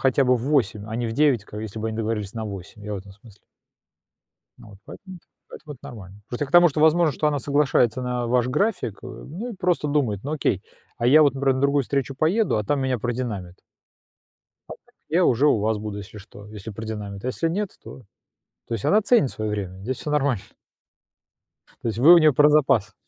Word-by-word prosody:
хотя 135 +1 +3
бы 125 0 +3
в 115 - -6
8, 120 -8 0
а 110 - -6
не 120 0 -2
в - - -4
9, 135 -4 +2
как 105 0 -8
если 110 0 -6
бы 110 - -2
они 110 - -5
договорились 110 -3 -3
на 110 -1 -5
8, 100 0 -9
я 105 0 -4
в - - -4
этом 95 +1 -13
смысле. 105 +1 -18 1.2
Ну - - -14
вот, 100 -2 -15
поэтому 190 -2 -11
это 175 - -19 0.2
поэтому 150 -1 -10
это 130 - -20
нормально. 100 -3 -11
Просто 125 +4 -3
к - - -15
тому, 175 0 +7
что, 150 0 -3
возможно, 155 -1 +3
она 145 -1 -1
соглашается 135 -3 +1
на 125 -1 -2
ваш 125 0 +1
график, 150 - -1
э, - - -8
ну 210 - -7
и - - -11
просто 180 -4 0
думает: 130 -9 0
"Ну, 145 - -4
окей, 120 - -1 0.3
а 120 - -1
я 150 +5 +7
вот, 140 -3 +3
например, 135 0 +1
на - - -2
другую 140 0 +2
встречу 135 +1 -2
поеду, 180 +11 +1
а 105 - -1
там 140 +7 0
меня 130 -2 -1
продинамят". 110 -7 -4 1.1
"А - - -7
так, - - -30
я 175 +3 +2
уже 130 +1 +3
у 145 - +4
вас 110 +1 0
буду, 105 -1 -6
если 105 +1 -10
что, 105 0 -14
если 105 0 -9
продинамит, 105 -2 -7
а - - -1
если 165 +6 -1
нет, 195 +3 -3
то". - - -11 0.7
То - - -4
есть, 115 - -3
она 210 +2 +4
ценит 220 - +3
свое 110 0 -4
время, 95 -3 -5
здесь 125 +5 -4
всё 150 - -5
нормально. 140 -8 +1 1.4
То - - -2
есть 110 - -3
вы 155 +8 +8
у - - +8
неё 155 -2 +5
про 145 +3 +5
запас. 135 -9 +2
125 Hz, 225 wpm, -23 LUFS, 105-150 Hz, 1.4 s, вы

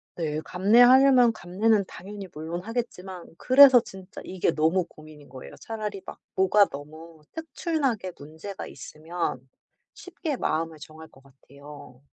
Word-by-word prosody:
네. 155 -2 -3
감내하려면 245 +6 +5
감내는 205 +1 0
당연히 200 +1 -9
물론 160 +3 -6
하겠지만 195 -6 -6
그래서 260 +2 +7
진짜 195 -3 -11
이게 185 -1 -1
너무 160 +4 +1
고민인 155 -3 -16
거예요. 130 0 -11
차라리 210 -3 -5
막 - - -10 0.2
뭐가 190 +2 +4
너무 155 +2 -11
특출나게 290 - -3
문제가 160 +7 -9
있으면 165 -1 -5 0.5
쉽게 360 -5 -6
마음을 160 -7 -2
정할 155 +1 -12
것 135 - -22
같아요. 140 -1 -15
185 Hz, 305 characters per minute, -25 LUFS, 155-225 Hz, 0.5 s, 그래서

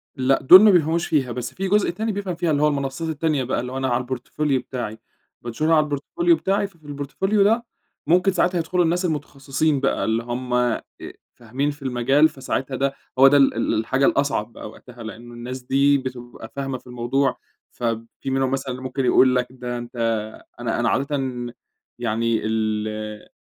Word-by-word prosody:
لأ، 135 0 +2
دول 185 +8 +10
ما 215 -1 +7
بيفهموش 170 -1 +2
فيها، 135 -6 +1
بس 125 0 -5
في 195 +1 -3
جزء 210 +1 +2
تاني 220 +6 -2
بيفهم 195 -3 -3
فيها، 170 -1 0
اللي 145 0 +1
هو 150 - +5
المنصات 140 +3 -2
التانية 155 -3 0
بقى، 125 - -1
اللي 125 +1 -5
هو 130 - -4
أنا 130 0 -1
على 125 +1 0
الPortfolio 130 +2 -1
بتاعي. 110 -4 -5 0.4
بانشرها 155 +8 0
على 155 -1 +4
الPortfolio 340 - -1
بتاعي، 200 +1 0
ففي 165 -6 -20
الPortfolio 145 +9 -3
ده 230 +3 +2 0.4
ممكن 180 +4 +4
ساعتها 180 0 +1
يدخلوا 175 +2 +1
الناس 175 +3 0
المتخصصين 145 -1 -1
بقى 135 - 0
اللي 115 +1 0
هم 125 +1 -4
آآ 125 -1 +1 0.5
فاهمين 130 +5 -3
في 145 0 -14
المجال، 135 +4 +3
فساعتها 135 0 -3
ده 135 +1 0 0.3
هو 135 - +9
ده 145 +1 +6
ال 135 - +4
ال 115 - -1
الحاجة 130 +5 +1
الأصعب 140 -6 0
بقى - - -8
وقتها؛ 120 +1 -14
لأنه 115 +2 -9
الناس 125 +2 -7
دي 140 +2 +3
بتبقى 120 -3 -8
فاهمة 135 -2 -3
في 125 - -19
الموضوع، 125 +2 0 0.3
فب 115 -1 -3
في - - -4
منهم 135 0 0
مثلًا 135 -1 -2
اللي 125 +1 -6
ممكن 130 0 -2
يقول 130 0 +5
لك 125 0 +1
ده 125 -1 -5
أنتَ 120 +1 -9 0.6
أنا 120 -1 -2
أنا 115 - +2
عادةً 140 +3 0 0.8
يعني 115 -1 0
ال 110 -1 -1
آآ 105 0 -6
135 Hz, 190 wpm, -22 LUFS, 120-155 Hz, 0.8 s, دول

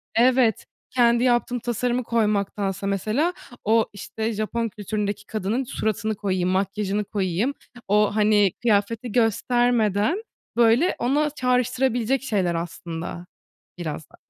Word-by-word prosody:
Evet, 245 -2 +3 0.2
kendi 240 -1 +3
yaptığım 245 0 +2
tasarımı 245 +1 -1
koymaktansa, 200 -3 0
mesela, 220 - 0 0.3
o 225 +1 +3
işte 220 +3 -4
Japon 225 +2 -2
kültüründeki 205 0 -3
kadının 215 +4 -2
suratını 220 -2 -2
koyayım, 185 -3 -1
makyajını 200 +2 -1
koyayım. 200 +5 -1 0.3
O, 210 +1 +3
hani, 210 -3 +4
kıyafeti 230 +1 +1
göstermeden, 240 - +2 0.3
böyle, 240 +9 +4
ona 290 +5 +1
çağrıştırabilecek 250 -1 0
şeyler 190 -9 0
aslında, 170 0 -5 0.5
biraz 160 -3 -5
da. - - -18
220 Hz, 110 wpm, -24 LUFS, 200-245 Hz, 0.5 s, hani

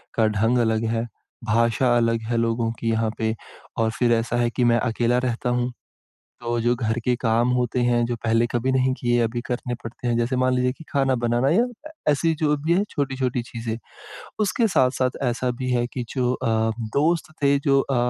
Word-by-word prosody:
का 110 -1 +3
ढंग 110 +4 +1
अलग 110 -1 +1
है, 115 0 -1 0.4
भाषा 115 +2 +2
अलग 115 -1 +1
है 120 - 0
लोगों 115 0 0
की 115 - -1
यहाँ 110 0 +1
पे 110 0 -1 0.4
और 110 -1 +1
फिर 120 -1 +3
ऐसा 115 +1 0
है 120 -1 +2
कि 125 - -1
मैं 120 -1 +4
अकेला 120 0 +1
रहता 125 0 -1
हूँ। 125 0 0 0.7
तो 120 0 -2
जो 120 +1 +2
घर 115 -1 -1
के 125 - +2
काम 120 0 +1
होते 125 0 0
हैं, 120 -1 +2
जो 120 - -2
पहले 115 +1 +3
कभी 120 +2 0
नहीं 130 0 +2
किए, 120 -2 +1
अभी 115 +1 -1
करने 125 0 -3
पड़ते 120 +2 -5
हैं, 120 - +1
जैसे, 120 +2 0
मान 130 0 +2
लीजिए 125 0 +1
कि 160 - -11
खाना 135 -2 +2
बनाना 120 +3 +1
या 210 +8 +4 0.2
अ, - - -8 0.2
ऐसी 160 +3 +1
जो 150 -1 +2
भी 155 +4 0
है 195 - +3
छोटी-छोटी 130 -3 -1
चीज़ें। 115 -1 -5 0.6
उसके 215 +3 +2
साथ-साथ 130 -5 +2
ऐसा 125 0 0
भी 130 - -2
है 120 -1 +1
कि 125 - -3
जो 125 -1 +1
अ, - - -3 0.5
दोस्त 160 +2 +1
थे 140 0 +4
जो 135 -1 +3
अ, 135 - -2
120 Hz, 205 wpm, -23 LUFS, 115-130 Hz, 0.7 s, मैं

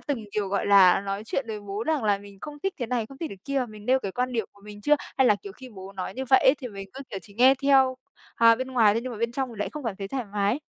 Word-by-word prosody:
từng, 265 -7 -4
kiểu, 205 -2 -1
gọi 200 0 -1
là, 195 -3 +6
nói 195 +1 -4
chuyện 260 +3 -2
với 215 -1 -4
bố 205 +1 -5
rằng 305 -5 0
là 205 -2 +2
mình 200 -1 -14
không 295 -1 -8
thích 390 -1 -1
thế 245 - -2
này, 235 -2 -1
không 270 +3 -14
thích 325 - -4
cái 195 - -9
kia, 275 -2 -1
mình 215 -1 -12
nêu 260 +1 +4
cái 195 -6 -5
quan 250 +1 -2
điểm 225 -4 -1
của 200 - -22
mình 210 0 -10
chưa? 295 +6 +4 0.2
Hay 265 - +5
là, 210 - +5
kiểu, 200 - -8
khi 260 +5 -12
bố 195 -4 -11
nói 190 0 -5
như 265 - -4
vậy 265 - +7
ấy 260 - +5
thì 250 - -6
mình 195 -2 -9
cứ, 270 - -8
kiểu, 195 - -4
chỉ 200 - -15
nghe 255 +4 +6
theo, 265 -2 +4 0.4
à, 230 0 +6
bên 260 +3 -4
ngoài 225 -5 +4
thôi 230 - 0
nhưng 255 0 -5
mà 220 - -7
bên 235 +1 -1
trong 265 +1 -2
thì 235 - -10
lại 205 - -2
không 300 -2 -8
cảm 220 -5 -3
thấy 195 0 -6
thoải 260 0 -3
mái? 205 +6 0
230 Hz, 325 wpm, -26 LUFS, 200-260 Hz, 0.4 s, vậy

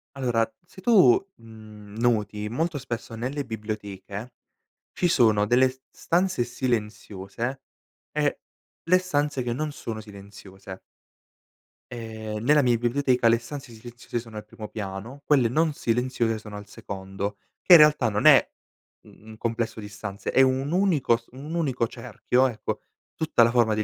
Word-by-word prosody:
Allora 120 -4 +1 0.2
se 190 - -15
tu, 190 - +6 0.2
mhmm, 110 -2 -13
noti 105 -3 0
molto 155 +7 -2
spesso 120 -4 -6
nelle 130 +5 -3
biblioteche 105 0 -6 0.6
ci 180 - 0
sono 110 -9 +4
delle 125 +4 +4
s 130 +1 -13
stanze 175 -7 0
silenziose 115 0 -3 0.5
e 150 -1 0 0.4
le 180 +3 +4
stanze 145 -7 -1
che 120 -1 -2
non 150 +4 -3
sono 110 -6 -6
silenziose. 100 -2 -12 1.1
Ehm, 110 -2 -6
nella 145 +3 +5
mia 120 -2 +3
biblioteca 125 +1 +1
le 115 0 +5
stanze 130 +1 -9
silenziose 120 +1 -7
sono 115 -2 -10
al 105 - -7
primo 105 0 -9
piano, 105 +7 -7
quelle 135 -6 +4
non 155 +3 +1
silenziose 120 -2 0
sono 105 -1 -9
al 105 - -10
secondo, 100 +1 -6 0.2
che 180 - +6
in - - +13
realtà 150 -6 +5
non 105 0 -2
è, - - +7 0.5
mhmm, 110 - -19
un 110 - -11
complesso 115 -1 -2
di 105 -1 -8
stanze 100 0 -6
è - - +5
un 135 +3 +2
unico 175 -11 +2
s 115 - -21
un 140 +5 -8
unico 130 -8 0
cerchio 130 +3 0
ecco, 115 -4 -4 0.3
tutta 155 -7 +3
la 115 - +3
forma 120 -3 +3
di 110 - 0
115 Hz, 155 wpm, -25 LUFS, 105-135 Hz, 1.1 s, in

